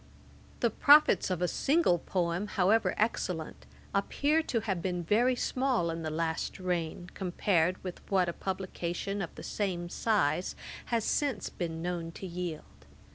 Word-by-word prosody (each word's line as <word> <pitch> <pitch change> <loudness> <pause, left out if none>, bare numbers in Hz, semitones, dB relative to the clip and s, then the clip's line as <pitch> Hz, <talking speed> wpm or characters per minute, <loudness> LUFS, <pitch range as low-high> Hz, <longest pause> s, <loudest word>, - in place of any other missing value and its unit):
The 235 - +3
profits 290 -5 +6
of 180 -1 -1
a - - +3
single 275 - +2
poem, 175 +3 -1
however 210 +3 +2
excellent, 180 -7 -2 0.3
appear 285 +10 +2
to 235 -7 -1
have 195 -5 -2
been 180 -1 -2
very 240 +8 +3
small 250 -9 0
in 165 0 -4
the 160 - -2
last 160 +3 -2
reign, 175 -1 -3
compared 180 -1 +1
with 185 -2 -6
what 190 -2 +3
a 170 - -2
publication 190 +1 -3
of 175 - -3
the - - -9
same 180 -4 -2
size 180 -6 +1 0.3
has 230 -2 0
since 285 -3 0
been 165 -2 -4
known 175 -2 -3
to 190 - -8
yield. 175 -3 -6
185 Hz, 150 wpm, -30 LUFS, 170-215 Hz, 0.3 s, profits